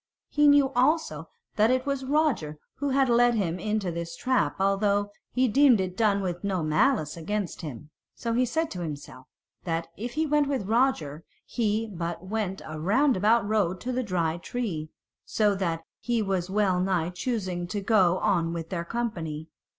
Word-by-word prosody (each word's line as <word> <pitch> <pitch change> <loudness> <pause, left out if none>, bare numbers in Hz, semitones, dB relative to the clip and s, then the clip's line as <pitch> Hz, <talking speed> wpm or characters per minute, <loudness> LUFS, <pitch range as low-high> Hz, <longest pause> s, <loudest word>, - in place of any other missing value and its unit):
He 295 0 +4
knew 285 -2 +5
also 245 - +1 0.3
that 215 +1 +4
it 255 +1 +1
was 275 -1 -2
Roger 265 - 0 0.2
who 285 0 -1
had 270 0 +3
led 240 0 +4
him 185 -5 -1
into 210 -2 -1
this 170 0 -5
trap, 255 +5 +1
although 200 +1 +1 0.2
he 255 +1 +2
deemed 255 -1 +5
it 185 -1 -2
done 200 -2 +2
with 175 -1 -3
no 190 -4 -1
malice 155 - +2
against 190 +3 -3
him. 150 -1 -8 0.2
So 230 -1 -3
he 245 +2 +3
said 320 +6 -1
to 180 - -5
himself 145 -5 -7 0.4
that 165 -1 -2
if 235 +3 -5
he 315 +1 0
went 295 -1 +2
with 270 -8 -1
Roger 205 - +1 0.2
he 220 -1 0
but 170 0 -4
went 195 -1 -3
a 155 0 -6
roundabout 220 - +3
road 195 -4 +1
to 255 - -3
the 255 +1 0
Dry 175 -7 -1
Tree; 175 -6 -4 0.3
so 210 -2 +1
that 170 -4 -2 0.2
he 235 -2 0
was 190 -2 -1
well 195 -2 +2
nigh 180 -2 0
choosing 185 -4 -3
to 205 +3 -3
go 195 -4 +3
on 175 -6 +1
with 165 -1 -5
their 170 -2 -2
company. 170 -8 -4
200 Hz, 175 wpm, -27 LUFS, 170-245 Hz, 0.4 s, knew